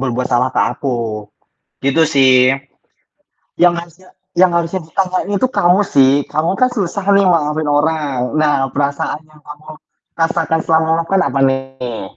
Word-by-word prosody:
berbuat 125 -1 -2
salah 125 +1 +1
ke - - +2 0.2
aku. 130 -4 -2 0.9
Gitu 140 +4 +2
sih. 130 -1 +5 1.3
Yang 175 -1 +5
harusnya 175 +2 -16 0.3
yang 185 - +6
harusnya 170 +2 -1
diutamain 185 +3 -2
itu 195 - 0
kamu 180 +1 +4
sih, 135 -1 +5 0.2
kamu 155 +3 0
kan 255 - +4
susah 200 -3 -3
nih 200 -1 +4
maafin 155 -3 0
orang. 145 -2 0 0.2
Nah, 150 -1 +2 0.2
perasaan 140 +1 -2
yang 150 - -20
kamu 150 +1 -13 0.5
rasakan 165 -1 0
selama 160 0 +2
maafkan 165 +4 0
apa 135 - -2
nih? 135 -4 -3
155 Hz, 145 wpm, -16 LUFS, 135-175 Hz, 1.3 s, yang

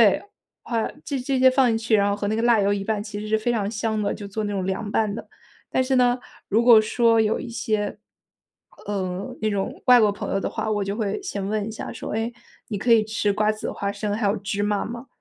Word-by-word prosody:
对， - - -8 0.4
花 230 -2 -1 0.2
这 280 - -3
些 - - -3
这 265 0 0
些 260 0 +7
放 260 0 +4
进 225 - +2
去， 225 0 +2
然 200 -1 +3
后 200 - +1
和 205 0 -3
那 215 - 0
个 225 - 0
辣 235 -3 +4
油 200 +1 +2
一 200 - -2
拌 210 -1 -1
其 210 -1 -6
实 210 - -6
是 220 +1 +2
非 230 +3 0
常 210 -4 -1
香 215 0 -1
的， 200 - 0
就 205 - -7
做 215 +2 -3
那 205 - -3
种 190 -2 -2
凉 190 +2 -2
拌 215 -1 +1
的。 225 - -7 0.4
但 260 - +1
是 260 +1 +1
呢， 245 0 +3 0.3
如 220 +3 +2
果 235 -2 +8
说 230 +1 +3
有 220 0 +1
一 - - -6
些， 215 -3 -2 0.9
呃， 190 -2 -3
那 215 - +1
种 200 -2 -3
外 250 -1 +8
国 210 -2 +4
朋 205 - -5
友 195 - +1
的 - - -2
话， - - -3
我 205 -1 0
就 200 +1 -3
会 215 - -2
先 200 - -3
问 210 0 -1
一 - - -4
下 220 - -6
说， - - -6
哎， 225 +2 -1 0.4
你 210 - -3
可 230 +4 +3
以 225 -2 +5
吃 215 -1 0
瓜 210 +1 +2
子、 215 - -5
花 200 -1 -3
生、 205 0 -3
还 215 -1 0
有 205 +2 +1
芝 200 +1 -3
麻 205 -1 0
吗？ 235 +3 -7
215 Hz, 285 characters per minute, -24 LUFS, 205-230 Hz, 0.9 s, 果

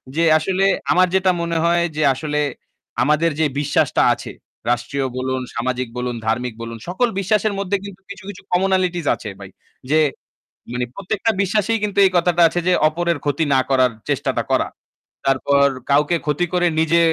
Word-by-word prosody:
যে 165 - +2
আসলে 185 +4 0 0.3
আমার 185 0 +4
যেটা 190 0 +3
মনে 170 -1 -1
হয় 170 0 +3
যে 155 - -1
আসলে 150 +2 -3 0.6
আমাদের 150 +4 +2
যে 160 - +3
বিশ্বাসটা 145 0 +1
আছে। - - -8 0.4
রাষ্ট্রীয় 130 +3 -1
বলুন, 130 0 -2
সামাজিক 125 +1 -2
বলুন, 125 0 -2
ধার্মিক 120 +2 -1
বলুন, 115 0 -6
সকল 190 +8 +1
বিশ্বাসের 210 +2 +1
মধ্যে 200 0 0
কিন্তু 195 -1 -10
কিছু, 200 -1 -9
কিছু 205 - -9
কমনালিটিস 180 -2 +1
আছে 105 - -8
ভাই। 100 -1 -10 0.4
যে 155 - +5 0.7
মানে 125 0 -1
প্রত্যেকটা 200 +4 -1
বিশ্বাসেই 210 +3 +1
কিন্তু 205 -1 -2
এই 190 - +3
কথাটা 175 0 +2
আছে 175 - -2
যে 180 - +4
অপরের 170 +1 -1
ক্ষতি 145 +2 +1
না 135 - +4
করার 130 -2 +3 0.2
চেষ্টাটা - - 0
করা। - - +2 0.6
তারপর 140 +1 +3 0.2
কাউকে 150 +4 +3
ক্ষতি 150 +3 +1
করে 175 -1 +3
নিজে 160 +1 +3
165 Hz, 165 wpm, -20 LUFS, 135-185 Hz, 0.7 s, যে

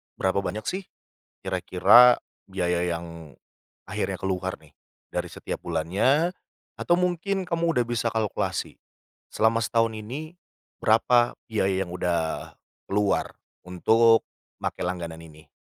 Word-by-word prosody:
berapa 95 +1 0
banyak 105 +3 -4
sih 190 +1 -2 0.6
kira-kira 125 0 +5 0.2
biaya 90 -2 -1
yang 85 -3 -5 0.6
akhirnya - - -3
keluar 95 0 -2
nih, 75 - -22 0.4
dari - - -2
setiap - - -6
bulannya 95 - +1 0.4
atau 175 - +2
mungkin 180 +2 0
kamu 170 -1 0
udah - - +3
bisa 120 -1 -1
kalkulasi 110 -2 -2 0.6
selama 110 +1 +3
setahun 115 0 +1
ini, 140 +10 -7 0.5
berapa 120 +2 +4
biaya 95 -4 0
yang 85 - -10
udah 85 -3 -2 0.4
keluar 100 0 +1 0.3
untuk 115 +6 +4 0.4
pakai - - -3
langganan 85 -3 -4
ini? 80 -1 -15
105 Hz, 115 wpm, -25 LUFS, 90-120 Hz, 0.6 s, kira-kira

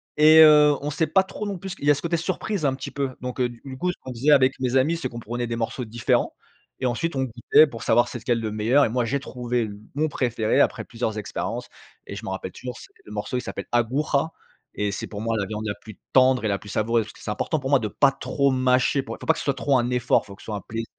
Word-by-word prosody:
et 155 +1 +8
heu, 150 -1 +7
on 145 - -3
sait 160 +1 0
pas 190 +5 +4
trop 205 +2 -6
non 200 -2 -3
plus 190 +2 -7
ce - - -5
qui - - -19
il - - -1
y - - +7
a 145 - +4
ce - - -6
côté 170 0 0
surprise 185 +1 -2
un 130 - 0
petit - - -7
peu 135 -3 -3
donc 125 0 -5
heu, 125 -1 +2
du 120 -1 -13
du 130 -1 -7
coup, 180 +6 -1
ce - - -12
qu'on 130 - -7
disait 130 +5 +1
avec 130 -2 +6
mes 130 -1 -1
amis, 145 +6 +3
c'est 165 - -3
qu'on 120 - -7
prenait 120 +1 -4
des 115 - -3
morceaux 115 +2 -3
différents 115 +1 0 0.4
et 130 - -2
ensuite 135 +7 -1
on 135 - +1
goûtait 125 +5 +4
pour 115 -7 -9
savoir 120 +2 +3
c'est 120 - -6
lequel 120 0 0
le 110 -1 -3
meilleur 115 +7 +3
et - - -1
moi 120 +1 0
j'ai 135 +5 -1
trouvé 125 -2 -3
l 105 -2 -6 0.2
mon 155 +1 +1
préféré 115 -5 0
après - - +1
plusieurs 115 -2 -3
expériences 105 - -4 0.4
et - - -7
je - - -8
m'en - - -4
rappelle 95 -1 -5
toujours, 125 +3 -7
c'est - - -13
le - - -12
morceau, 105 +4 -3
il - - -2
s'appelle - - -6
Aguja 135 +6 +1 0.5
et 105 -1 -1
c'est 100 - -5
pour 100 - -7
moi 115 0 -1
la 100 -3 -1
viande 110 +1 -5
la 105 - -1
plus 110 -3 -12 0.2
tendre 130 -3 +4
et - - +2
la 100 -1 0
plus 105 - -12
savoureuse, 110 +2 +1
parce 105 - -12
que - - -18
c'est 105 - -3
important 155 +8 -1
pour 135 0 -4
moi 140 - +5
de 110 - -2
pas 135 +7 +3
trop 140 0 0
mâcher 130 +1 +2
pour - - -7
faut - - -9
pas - - +4
que - - -7
ce - - -6
soit 140 - +2
trop 135 -1 +2
un 120 - -1
effort, 125 -3 +1
faut 100 - -10
que - - -17
ce - - -14
soit 110 - -4
un - - -7
plaisir 115 +1 -4
125 Hz, 300 wpm, -24 LUFS, 115-145 Hz, 0.5 s, et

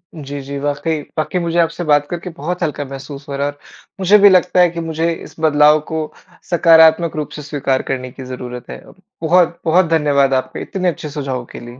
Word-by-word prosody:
जी, 145 -2 -7
जी, 140 +1 -6
वाक़ई। 145 +2 -2 0.2
वाक़ई 155 +4 -1
मुझे 170 0 -2
आपसे 165 +1 0
बात 145 -2 +2
करके 175 +1 -5
बहुत 175 +5 -3
हल्का 150 -3 -2
महसूस 140 +2 -9
हो 140 - -4
रहा। 140 +1 0 0.5
मुझे 195 +2 +5
भी 205 0 +8
लगता 185 -1 +3
है 180 -1 +6
कि 170 0 -6
मुझे 165 0 -1
इस - - -11
बदलाव 150 -1 +4
को 160 - -1 0.5
सकारात्मक 165 -1 +5
रूप 150 -1 -3
से 150 - -7
स्वीकार 140 -2 -1
करने 130 -1 -4
की 130 - -10
ज़रूरत 125 -1 -8
है। - - -8 0.4
बहुत-बहुत 170 +1 +3
धन्यवाद 145 -4 +2
आपका 130 -1 -2
इतने 185 -3 -2
अच्छे 155 -2 -6
सुझावों 135 -4 -4
के - - -6
लिए। 120 +1 -11
155 Hz, 195 wpm, -17 LUFS, 140-170 Hz, 0.5 s, भी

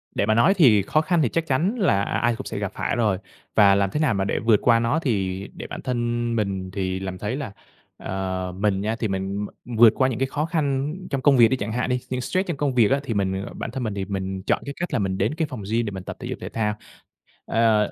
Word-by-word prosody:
Để - - +1
mà 110 - +3
nói 120 - +5
thì 125 - +5
khó 155 +10 +1
khăn 170 +1 +1
thì 130 - +2
chắc 165 +5 -1
chắn 165 - +1
là 140 - +3
ai 120 +2 0
cũng - - -7
sẽ - - -5
gặp - - -3
phải - - -1
rồi. 110 -5 +1 0.4
Và 100 -2 +6
làm 100 -1 +2
thế 150 - -1
nào 150 -8 +2
mà 95 -1 0
để - - -1
vượt 110 -3 +3
qua 115 -1 +4
nó 120 +7 +1
thì 100 - -1
để - - -8
bản - - -7
thân 120 -1 -1
mình 95 -3 -2
thì 95 -1 -2
làm 95 -1 -5
thấy 105 +7 -3
là 140 -7 -5 0.5
ờ, 95 -1 -3
mình 100 -1 +1
nha 110 +2 -1
thì 115 - 0
mình 95 +1 -2 0.2
vượt 115 -2 +5
qua 130 0 +2
những 120 - -3
cái 135 - +1
khó 150 +3 -2
khăn 150 -3 -1
trong 135 -2 -2
công 135 0 +5
việc 115 -1 +8
đi 130 - 0
chẳng 105 -2 -4
hạn 125 +3 -1
đi, 125 0 +1
những 125 0 -2
stress 185 +9 -1
trong 170 - -2
công 140 -2 -1
việc 115 -4 +4
á, 140 - +3
thì 120 - -3
mình, 95 -2 0
ờ, - - -9
bản - - -5
thân 130 +1 -4
mình 110 -3 -2
thì 100 -1 -3
mình 95 -1 -4
chọn - - +1
cái 140 - -5
cách 175 -2 -3
là 125 - +2
mình 95 -1 -1
đến 105 +9 0
cái 160 -2 -1
phòng 125 -7 -7
gym 115 +1 +1
để 105 - -3
mình 95 -1 -7
tập - - -6
thể - - -6
dục - - -5
thể - - -5
thao. 105 -2 -1 0.7
Ơ. 110 -2 +2
115 Hz, 280 wpm, -24 LUFS, 100-130 Hz, 0.7 s, việc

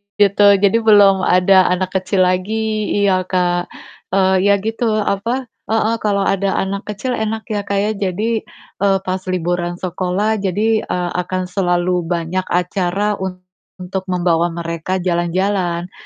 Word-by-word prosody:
Gitu. 205 0 +4 0.2
Jadi 200 +3 +4
belum 205 -3 +5
ada 185 +1 +4
anak 185 +1 -1
kecil 185 0 +1
lagi, 215 +4 -1 0.2
iya, 185 -2 +1
Kak, 175 -1 0 0.5
eee, 190 -1 +3
ya 200 - +5
gitu, 225 +1 -1 0.2
apa, 230 +7 -1 0.2
heeh, 225 +1 +1
kalau 200 -2 0
ada 195 0 0
anak 200 +1 -5
kecil 210 +5 -4
enak 220 -1 -2
ya, 205 - 0
Kak, 200 - -1
ya, 210 +1 0
jadi, 210 +3 -1 0.4
eee, 195 -1 +3
pas 185 0 -2
liburan 175 -1 -1
sekolah 185 +4 -1
jadi, 200 +3 -1 0.2
eee, 180 -1 -2 0.2
akan 185 0 -2
selalu 180 -2 0
banyak 175 +2 -2
acara 185 +3 -1
untuk 185 0 -7
membawa 175 -2 +1
mereka 170 +2 -3
jalan-jalan, 175 0 -1
190 Hz, 140 wpm, -18 LUFS, 180-205 Hz, 0.5 s, belum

